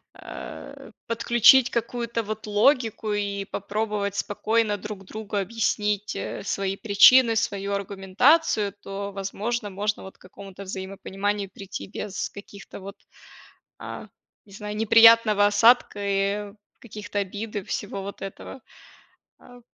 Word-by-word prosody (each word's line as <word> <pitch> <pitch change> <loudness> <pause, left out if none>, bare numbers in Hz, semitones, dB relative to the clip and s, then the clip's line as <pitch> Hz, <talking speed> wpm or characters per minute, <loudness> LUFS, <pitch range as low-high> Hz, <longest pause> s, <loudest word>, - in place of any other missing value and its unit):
э, - - -10 0.2
подключить 235 +2 +5
какую-то, 235 0 -2
вот, 215 +1 -6
логику 220 0 +2
и 200 -1 -2
попробовать 205 0 -3
спокойно 215 +1 0
друг 200 -1 -8
другу 215 +1 -7
объяснить, 210 0 -1
э, - - -5
свои 195 -1 -2
причины, 225 +3 +6
свою 200 -1 -1
аргументацию, 200 - +2
то, 200 +1 -6
возможно, 205 +3 -3
можно 205 +2 -2
вот 190 - -12
к - - -49
какому-то 195 +1 -11
взаимопониманию 195 +1 -4
прийти 195 -1 -7
без, 200 0 -5
каких-то 200 0 -11
вот, 195 +1 -9 0.8
а, - - -8 0.4
не 200 - -20
знаю, 210 +1 -7
неприятного 225 -1 +6
осадка, 215 +1 +4
и 200 +1 -1 0.3
каких-то 210 -3 -6
обид, 205 +3 -5
и 205 - -1
всего 200 +1 -4
вот 200 0 -8
этого, 195 +7 -8 0.8
э. 245 -1 -16
205 Hz, 120 wpm, -25 LUFS, 200-225 Hz, 0.8 s, причины